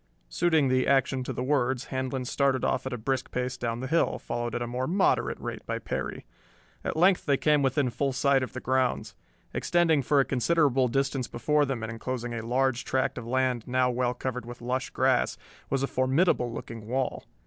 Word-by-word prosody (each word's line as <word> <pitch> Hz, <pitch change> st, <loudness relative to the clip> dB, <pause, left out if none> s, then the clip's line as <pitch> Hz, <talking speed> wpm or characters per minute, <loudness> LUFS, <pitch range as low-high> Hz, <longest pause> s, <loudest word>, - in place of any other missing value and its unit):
Suiting 160 Hz, -, +2 dB
the 130 Hz, 0 st, +2 dB
action 135 Hz, -1 st, +2 dB
to -, -, -4 dB
the 125 Hz, -, -3 dB
words 130 Hz, -2 st, 0 dB
Handlon 130 Hz, 0 st, -2 dB
started 135 Hz, +1 st, +1 dB
off 130 Hz, 0 st, 0 dB
at -, -, -4 dB
a 125 Hz, -, -3 dB
brisk 130 Hz, +3 st, -2 dB
pace 125 Hz, 0 st, -2 dB
down 120 Hz, -1 st, -3 dB
the 130 Hz, -, -3 dB
hill, 165 Hz, +3 st, +2 dB
followed 120 Hz, -1 st, -4 dB
at 120 Hz, -, -2 dB
a -, -, -2 dB
more 125 Hz, +2 st, -2 dB
moderate 190 Hz, +4 st, +1 dB
rate -, -, -6 dB
by -, -, -1 dB
Perry. -, -, -4 dB, 0.6 s
At -, -, -3 dB
length 180 Hz, +1 st, +4 dB
they 140 Hz, -1 st, +3 dB
came 150 Hz, 0 st, +3 dB
within 135 Hz, -1 st, +1 dB
full 135 Hz, +4 st, 0 dB
sight 135 Hz, +1 st, +2 dB
of 130 Hz, -, -4 dB
the 130 Hz, -, -4 dB
grounds. 130 Hz, -1 st, 0 dB, 0.4 s
Extending 165 Hz, -4 st, +2 dB
for 140 Hz, +2 st, +2 dB
a 135 Hz, -, +4 dB
considerable 135 Hz, -1 st, +2 dB
distance 135 Hz, 0 st, 0 dB
before 150 Hz, +7 st, +1 dB
them 130 Hz, -5 st, -3 dB
and 110 Hz, -, -4 dB
enclosing 120 Hz, +1 st, -4 dB
a 115 Hz, -1 st, -4 dB
large 130 Hz, +2 st, +1 dB
tract 130 Hz, -1 st, -1 dB
of 115 Hz, -, -8 dB
land 130 Hz, -2 st, 0 dB
now 125 Hz, 0 st, +2 dB
well 125 Hz, 0 st, 0 dB
covered 125 Hz, 0 st, -4 dB
with 120 Hz, 0 st, -8 dB
lush 130 Hz, +2 st, -2 dB
grass, 130 Hz, -1 st, +1 dB, 0.3 s
was 135 Hz, 0 st, 0 dB
a -, -, +1 dB
formidable 130 Hz, 0 st, +2 dB
looking 115 Hz, -2 st, -7 dB
wall. 130 Hz, +2 st, -2 dB
130 Hz, 205 wpm, -28 LUFS, 125-135 Hz, 0.6 s, length